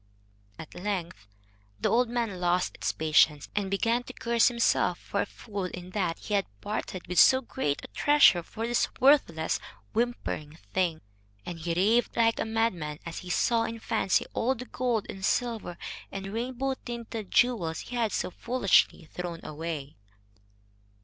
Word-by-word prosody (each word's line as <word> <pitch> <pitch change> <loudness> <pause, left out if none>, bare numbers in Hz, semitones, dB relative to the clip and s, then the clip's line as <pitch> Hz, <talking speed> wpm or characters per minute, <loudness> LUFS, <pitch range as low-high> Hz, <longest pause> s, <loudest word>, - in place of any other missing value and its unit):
At 160 - -10
length 175 - -4 0.5
the - - +1
old 245 0 +3
man 230 -6 -2
lost 175 +1 +1 0.2
patience, 155 -2 +3
and 200 -2 0
began 230 +5 +1
to - - -9
curse 235 0 +3
himself 235 -1 +2
for - - -2
a - - 0
fool 200 -4 -6
in 180 0 -7
that 180 -5 -1
he 210 - -6
had 200 -1 +2
parted 190 - -4
with 180 0 +1
so 260 - +8
great 190 - -2
a - - -8
treasure 290 -11 +5
for 220 +6 -5
this 240 0 +2
worthless, 250 - +3 0.3
whimpering 225 -10 -2 0.2
thing. 175 -4 +1 0.4
And 175 -2 -6
he 165 +1 -2
raved 220 +8 +2
like 230 -1 +3
a - - 0
madman 220 -10 -1
as 170 - -5
he 180 - -9
saw 230 +5 +2
in 230 0 -4
fancy 195 -3 +1
all 260 +3 +1
the 250 +1 -7
gold 245 -5 -1
and 190 -1 -8
silver 225 -5 -1 0.3
and 195 0 -6
rainbow 255 +3 -1
tinted 230 -3 -6
jewels 200 -11 +2
he 245 - -7
had 230 -3 +1
so - - -2
foolishly 230 -7 +2
thrown 170 +1 -6
away. 150 -3 -5
200 Hz, 160 wpm, -28 LUFS, 170-235 Hz, 0.5 s, so